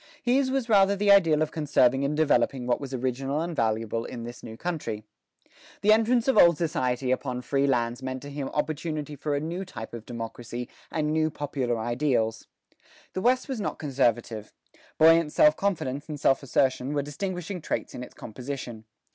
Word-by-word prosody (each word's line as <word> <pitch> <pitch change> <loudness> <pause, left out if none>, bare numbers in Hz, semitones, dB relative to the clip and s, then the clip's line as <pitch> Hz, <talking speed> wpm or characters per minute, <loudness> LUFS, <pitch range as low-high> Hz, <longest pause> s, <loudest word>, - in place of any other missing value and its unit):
His 260 +2 +2
was 265 -2 -1
rather 200 -3 +5
the 200 0 +3
ideal 165 -6 +5
of 155 - -4
conserving 140 -4 +2
and 145 +2 -1
developing 140 -4 +2
what 125 +2 0
was 135 -2 -6
original 130 +2 -2
and 170 +1 -3
valuable 115 -1 0
in 120 -1 -7
this 120 +1 -8
new 115 -1 -9
country. 125 -10 -4 0.8
The 215 +1 +6
entrance 230 +2 +2
of 265 - +4
old 170 -2 +7
society 130 -6 0
upon 125 -1 -2
free 140 +2 +1
lands 120 -2 0
meant 130 0 -5
to 145 - -8
him 140 -1 -4
opportunity 150 0 -3
for 145 +1 -2
a - - 0
new 170 +5 -4
type 110 -13 -8
of 115 -2 -8
democracy 120 +1 -6 0.2
and 155 -1 -1
new 155 0 +2
popular 135 -5 -2
ideals. 120 -1 0 0.7
The 185 - -2
West 255 +6 +2
was 260 -6 -3
not - - -3
conservative: 120 -6 -1 0.5
buoyant 165 -1 +5
self 150 0 +6
confidence 155 -8 -2
and 150 -1 -5
self 135 -1 +3
assertion 135 +1 +1
were 145 - +1
distinguishing 180 +4 -4
traits - - -3
in - - -6
its 125 - -10
composition. 120 -1 -7
140 Hz, 180 wpm, -27 LUFS, 125-165 Hz, 0.8 s, old